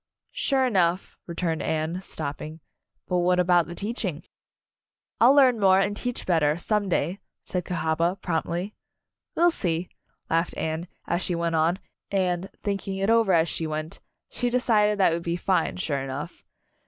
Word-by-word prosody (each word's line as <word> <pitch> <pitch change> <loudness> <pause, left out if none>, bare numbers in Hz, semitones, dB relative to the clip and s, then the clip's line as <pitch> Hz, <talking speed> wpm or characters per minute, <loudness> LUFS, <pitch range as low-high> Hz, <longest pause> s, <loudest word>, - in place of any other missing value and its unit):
"Sure 265 -2 +1
enough," 185 -6 +1
returned 170 -2 -2
Anne, 160 +3 -2
stop 150 -6 -5
ping, 155 +1 -8 0.5
"but 180 - 0
what 180 +1 +2
about 175 -2 +4
the 175 - -7
teaching?" 200 - -3 1.0
"I'll 250 +4 +7
learn 255 -5 +5
more, 190 -1 +5
and 200 +1 +1
teach 245 +2 -3
better, 160 -4 +2
some 205 +2 0
day," 180 +2 0 0.2
said 180 -2 -3
Cahaba, 165 +2 0
promptly. 175 +3 -2 0.6
"We'll 345 +1 +4
see," 175 - -2 0.4
laughed 165 +1 0
Anne, 160 +2 -2 0.2
as 175 +1 -1
she 180 - -1
went 170 0 -1
on, 165 +3 +2 0.3
and, 185 -1 0
thinking 195 -1 -2
it 195 +3 +1
over 230 -4 +4
as 165 -1 +4
she 160 0 -2
went, 155 +1 -5 0.3
she 245 - -2
decided 215 -4 +2
that 190 -4 +4
it - - +1
would - - -6
be 170 0 -1
fine, 185 +1 0
sure 145 -6 -1
enough. 135 +5 -6
180 Hz, 165 wpm, -26 LUFS, 165-200 Hz, 1.0 s, I'll